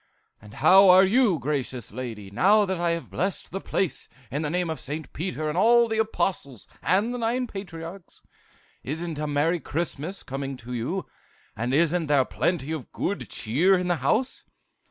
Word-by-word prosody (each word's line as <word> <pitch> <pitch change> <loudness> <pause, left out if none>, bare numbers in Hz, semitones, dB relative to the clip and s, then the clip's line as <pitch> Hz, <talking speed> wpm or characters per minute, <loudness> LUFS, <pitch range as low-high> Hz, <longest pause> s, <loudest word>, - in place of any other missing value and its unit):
"'And 105 +2 -14
how 195 +1 +7
are 185 +1 +8
you, 215 -3 +3
gracious 130 -4 -3
lady, 110 -4 -7
now 205 - +4
that 190 -2 -2
I 170 0 +1
have 170 0 -3
blessed 195 +1 -3
the 195 +2 -4
place 190 -5 -2 0.2
in 145 - -2
the 150 - -2
name 180 +2 0
of 160 -1 -4
Saint 150 +3 -6
Peter 160 -2 -3
and 150 - -2
all 235 +5 +5
the 220 0 -1
Apostles 185 - -2
and 200 +7 +1
the 245 - -4
nine 240 +2 0
patriarchs? 180 -3 -9 0.6
Isn't 160 +2 -4
a 150 - -2
merry 150 +4 +1
Christmas 165 +3 -4
coming 135 -1 -5
to 125 +1 -8
you? 145 +11 -2 0.5
And 120 +3 -2
isn't 165 +3 +2
there 140 -3 +3
plenty 160 -1 -1
of 155 -6 -5
good 200 - -3
cheer 160 - +2
in 180 0 -2
the 175 - +2
house? 215 - 0
165 Hz, 175 wpm, -25 LUFS, 140-195 Hz, 0.6 s, are